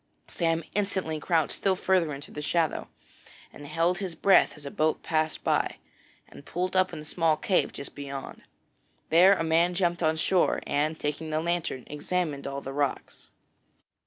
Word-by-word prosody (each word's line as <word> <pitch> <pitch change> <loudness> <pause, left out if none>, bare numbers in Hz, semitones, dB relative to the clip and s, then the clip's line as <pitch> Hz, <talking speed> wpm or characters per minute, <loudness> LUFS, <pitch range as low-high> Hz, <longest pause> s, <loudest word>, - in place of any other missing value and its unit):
Sam 165 -1 0
instantly 190 -6 -1
crouched 160 -1 +1
still 195 -1 +1
farther 185 -4 +1
into 140 0 -8
the 150 - -6
shadow, 165 +1 0 0.7
and 145 - -10
held 165 +4 +1
his 185 -4 -4
breath 195 -1 +5
as 145 - -13
a 140 - -5
boat 155 0 0
passed 155 -1 -1
by, - - +1 0.5
and - - -13
pulled 180 +5 -3
up 185 0 +3
in 165 - -7
a 150 - -7
small 160 -1 +1
cave 200 -7 +1
just 140 - -9
beyond. 140 -1 -7 0.7
Then 185 +4 +6
a - - -1
man 165 +2 +2
jumped 175 -1 0
on 160 -1 +2
shore, 180 +3 +2
and, 155 +2 0
taking 150 +2 -3
the 155 0 0
lantern, 170 -6 -2
examined 150 -1 -3
all 140 0 -4
the 135 - -6
rocks. 140 -1 -3
160 Hz, 170 wpm, -27 LUFS, 150-180 Hz, 0.7 s, Then